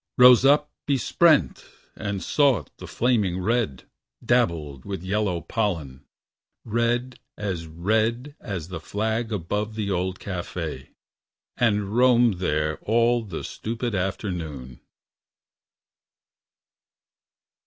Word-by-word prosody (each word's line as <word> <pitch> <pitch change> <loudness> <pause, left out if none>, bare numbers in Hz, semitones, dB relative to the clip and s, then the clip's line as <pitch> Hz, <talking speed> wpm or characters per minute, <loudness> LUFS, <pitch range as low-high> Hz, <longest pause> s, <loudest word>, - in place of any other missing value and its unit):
Rose 125 -1 +8
up 150 +2 +4 0.2
besprent 150 +3 +3 0.3
and 100 -2 -4
sought 135 - +2
the - - -9
flaming 105 -7 +1
red 95 - 0 0.4
Dabbled 85 - +1
with 95 -3 -5
yellow 95 -2 -1
pollen 80 - -3 0.6
red 120 +3 -1 0.2
as 95 -6 -3
red 110 - 0
As 95 -6 -5
the 95 - -5
flag 110 +2 -2
about 105 +3 -2
the 105 -2 -2
old 95 0 -1
cafe 85 -7 -5 0.7
And 105 -3 +1
roamed 120 -5 +4
there 75 -3 0
all 115 +2 +2
the 95 -7 -6
stupid 115 +1 -4
afternoon. 85 - -4
105 Hz, 100 wpm, -24 LUFS, 90-120 Hz, 0.7 s, Rose